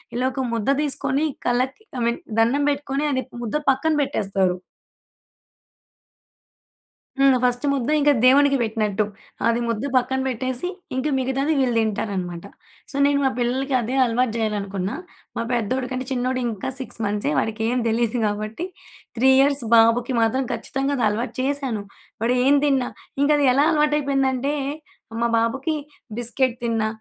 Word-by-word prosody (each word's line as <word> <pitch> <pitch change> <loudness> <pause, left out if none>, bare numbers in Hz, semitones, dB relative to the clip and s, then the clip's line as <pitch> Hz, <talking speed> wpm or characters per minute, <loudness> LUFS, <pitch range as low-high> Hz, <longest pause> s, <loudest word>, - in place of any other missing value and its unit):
ఇలా 250 +1 0
ఒక 265 0 -2
ముద్ద 230 +3 -1
తీసుకొని 280 0 0 0.2
కళ్ళకి, 255 - 0 0.2
ఐ - - -2
మీన్ 235 0 0 0.2
దన్నం 270 +6 +3
బెట్టుకొని, 285 0 -1
అది 260 -1 0
ప్ - - -32
ముద్ద 235 +7 -1
పక్కన 280 +4 +2
బెట్టేస్తారు. 195 -7 0 2.6
హ్మ్. 275 -1 +6
ఫస్ట్ 245 +3 +1
ముద్ద 265 -1 -1
ఇంక 295 0 +3 0.2
దేవునికి 275 +1 +5
పెట్టినట్టు. 215 -2 0 0.4
అది 230 +1 +2
ముద్ద 230 +1 -2
పక్కన 260 +1 +2
పెట్టేసి, 255 +5 -2 0.3
ఇంక 260 +3 -1
మిగతాది 270 +4 0
వీళ్ళు 250 -3 +1
దింటారనమాట. 195 -5 -2 0.5
సో, - - -10
నేను 285 0 +3
మా - - +4
పిల్లలకి 260 +3 -1
అదే 245 +4 -3
అలవాటు 235 0 0
జేయాలనుకున్న. 200 -3 -2 0.5
మా - - 0
పెద్దోడి 250 +3 -1
కంటే 255 0 -3
చిన్నోడు, 255 0 0
ఇంకా 215 +3 -4
6 260 - -7
మంత్సే, 205 -5 -1
వాడికేమి 225 +3 -1
దెలీదు 230 +1 0
కాబట్టి, 215 - -3 0.5
3 265 +3 +4
ఇయర్స్ 275 -1 +3
బాబుకి 230 +3 +4
మాత్రం 255 +4 +1
ఖచ్చితంగా 270 +4 -2
అది 240 - +1
అలవాటు 230 +5 -3
చేశాను. 265 -6 -1 0.4
వాడేం 250 +4 +3
తిన్నా, 270 -3 +1 0.3
ఇంకది 290 -1 +3
ఎలా 285 +3 +4
అలవాటైపోయిందంటే, 280 -3 +1 0.7
మా 235 - +3
బాబుకి 270 +7 -1 0.4
బిస్కెట్ 240 +1 0
తిన్నా, 225 -2 0
255 Hz, 140 wpm, -22 LUFS, 225-275 Hz, 2.6 s, హ్మ్